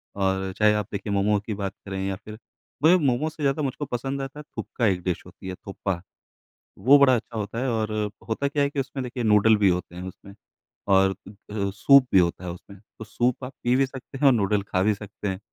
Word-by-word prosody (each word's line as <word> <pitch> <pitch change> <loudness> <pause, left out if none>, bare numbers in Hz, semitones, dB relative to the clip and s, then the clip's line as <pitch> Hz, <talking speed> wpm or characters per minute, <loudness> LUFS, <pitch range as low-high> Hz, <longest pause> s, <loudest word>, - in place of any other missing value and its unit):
और 95 -1 0
चाहे 105 0 +5
आप 105 -2 -1
देखिए, 100 0 -3
मोमो 100 +1 +2
की 110 - -3
बात 100 -1 -4
करें, 95 -1 -4
या 95 - -2
फिर 105 +2 -11 0.5
पर 160 - +7
ये 180 - +7
मोमोज़ 150 0 0
से 150 - -7
ज़्यादा 140 +2 +1
मुझको 140 +1 -2
पसंद 135 +2 -3
आता 135 +2 -6
है, - - -8
थुकपा 120 - -2
एक 90 -3 +1
डिश 90 -2 -2
होती - - -12
है, 95 - -4
थोपा। 95 -2 -4 0.8
वो 130 +9 +6
बड़ा 135 -2 +6
अच्छा 115 0 -5
होता 110 +2 -3
है, 130 +1 0
और 110 -2 -1 0.4
होता 125 +5 0
क्या 145 0 +1
है 140 - +1
कि 140 - -4
उसमें 135 0 -3
देखिए, 125 0 -4
नूडल 110 0 +5
भी 100 -2 +4
होते 90 -1 -2
हैं 90 - -6
उसमें 100 +2 -12 0.6
और 95 0 +5 0.4
अ - - -7
अ, 100 -2 -1
सूप 140 +5 +6
भी 95 - +8
होता 85 0 0
है 90 - -3
उसमें। 100 +3 -12 0.2
तो 110 - -7
सूप 120 +4 -1
आप 130 - -8
पी 120 +1 +3
भी 135 +1 +3
सकते 135 0 -10
हैं 145 - +1
और 135 - +7
नूडल 105 -2 +1
खा 95 -2 -1
भी 105 +2 +3
सकते 105 0 -7
हैं 95 -1 -2
110 Hz, 245 wpm, -25 LUFS, 100-130 Hz, 0.8 s, भी